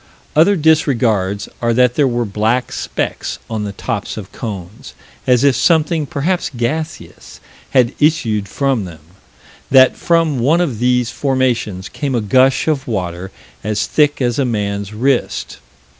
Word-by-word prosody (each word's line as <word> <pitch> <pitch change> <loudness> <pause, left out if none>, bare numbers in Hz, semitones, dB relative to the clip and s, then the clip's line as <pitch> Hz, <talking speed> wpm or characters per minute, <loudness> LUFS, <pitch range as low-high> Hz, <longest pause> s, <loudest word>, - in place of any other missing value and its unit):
Other 170 +7 +5
disregards 115 - +1
are 115 -1 +1
that 125 0 +4
there 140 +1 +2
were 120 -1 -1
black 110 +5 0
specks - - -3
on 110 -2 -2
the 100 - -4
tops 100 - -4
of - - -8
cones, 105 +3 -8 0.3
as 125 0 +4
if 140 -3 +4
something, 160 -2 +2
perhaps 170 +7 -1
gaseous, 155 +6 -5 0.3
had 125 -1 +3
issued 115 -10 +1
from 135 -3 -1
them; 80 -3 -11 0.7
that 130 -1 +6
from 165 -5 +1
one 145 +8 +3
of 140 -11 -1
these 125 -1 +1
formations 120 -8 -1
came 140 -4 -3
a 120 - +1
gush 130 +7 +3
of 145 -4 0
water 90 -4 -3 0.3
as 105 0 -1
thick 145 -3 +1
as 120 +1 0
a - - +3
man's 100 -4 -2
wrist. 125 +4 -1
125 Hz, 145 wpm, -17 LUFS, 105-145 Hz, 0.7 s, that